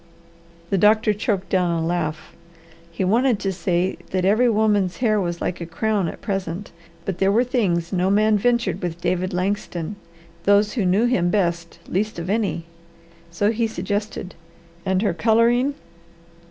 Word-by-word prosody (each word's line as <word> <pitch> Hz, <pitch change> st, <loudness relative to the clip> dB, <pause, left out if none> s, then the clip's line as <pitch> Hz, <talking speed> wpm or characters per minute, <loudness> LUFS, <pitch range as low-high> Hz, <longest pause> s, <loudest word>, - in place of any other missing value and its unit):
The 195 Hz, -, +2 dB
doctor 215 Hz, +1 st, +4 dB
choked 200 Hz, -2 st, -2 dB
down 180 Hz, -2 st, +2 dB
a 165 Hz, -1 st, 0 dB
laugh. 165 Hz, -2 st, -3 dB, 0.6 s
He 170 Hz, +3 st, -3 dB
wanted 235 Hz, +5 st, +3 dB
to 195 Hz, -1 st, -1 dB
say 180 Hz, +1 st, 0 dB
that 185 Hz, -1 st, 0 dB
every 220 Hz, +5 st, +4 dB
woman's 210 Hz, -4 st, +2 dB
hair 215 Hz, -4 st, +2 dB
was 175 Hz, -2 st, -3 dB
like 180 Hz, -, -3 dB
a -, -, -3 dB
crown 200 Hz, +2 st, 0 dB
at -, -, -7 dB
present, 195 Hz, -1 st, -4 dB, 0.3 s
but 185 Hz, -2 st, -3 dB
there 195 Hz, 0 st, +3 dB
were 230 Hz, +4 st, +4 dB
things 195 Hz, -9 st, 0 dB
no 185 Hz, +1 st, +1 dB
man 215 Hz, +2 st, +3 dB
ventured 215 Hz, -4 st, +1 dB
with 175 Hz, -2 st, -4 dB
David 185 Hz, +1 st, -1 dB
Langston; 185 Hz, 0 st, -2 dB, 0.5 s
those 205 Hz, +1 st, +4 dB
who 215 Hz, -8 st, 0 dB
knew 195 Hz, +6 st, +3 dB
him 190 Hz, -8 st, +2 dB
best, 170 Hz, -3 st, -1 dB
least 210 Hz, +3 st, -1 dB
of 170 Hz, +3 st, -3 dB
any. 205 Hz, -6 st, -1 dB, 0.6 s
So 205 Hz, +5 st, +1 dB
he 230 Hz, 0 st, 0 dB
suggested, 205 Hz, -1 st, -4 dB, 0.5 s
"And 190 Hz, +1 st, +1 dB
her 200 Hz, -5 st, +1 dB
colouring?" 235 Hz, -, +3 dB
195 Hz, 160 wpm, -22 LUFS, 175-215 Hz, 0.6 s, doctor